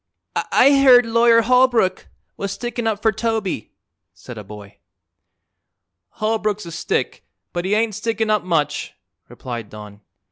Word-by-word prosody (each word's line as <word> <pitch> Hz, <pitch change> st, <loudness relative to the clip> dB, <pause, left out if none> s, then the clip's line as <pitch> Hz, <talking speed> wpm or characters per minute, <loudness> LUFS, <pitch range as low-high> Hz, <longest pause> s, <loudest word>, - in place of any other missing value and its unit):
"I 280 Hz, 0 st, +5 dB
heard 250 Hz, -3 st, +7 dB
Lawyer 230 Hz, 0 st, +4 dB
Holbrook 245 Hz, -5 st, +2 dB, 0.3 s
was 200 Hz, -1 st, -4 dB
stickin' 240 Hz, +2 st, -4 dB
up 215 Hz, -2 st, -2 dB
for 220 Hz, -, +4 dB
Toby," 215 Hz, -, -3 dB, 0.4 s
said 125 Hz, -, -11 dB
a 105 Hz, -, -8 dB
boy. 100 Hz, 0 st, -13 dB, 1.3 s
"Holbrook's 215 Hz, -2 st, -2 dB
a 170 Hz, -, -8 dB
stick, -, -, -3 dB, 0.3 s
but 175 Hz, 0 st, -3 dB
he 200 Hz, +2 st, +1 dB
ain't 220 Hz, 0 st, 0 dB
stickin' 225 Hz, +1 st, -2 dB
up 210 Hz, -2 st, +1 dB
much," 165 Hz, -5 st, -2 dB, 0.3 s
replied 120 Hz, -4 st, -7 dB
Don. 105 Hz, -1 st, -12 dB
215 Hz, 135 wpm, -20 LUFS, 170-230 Hz, 1.3 s, heard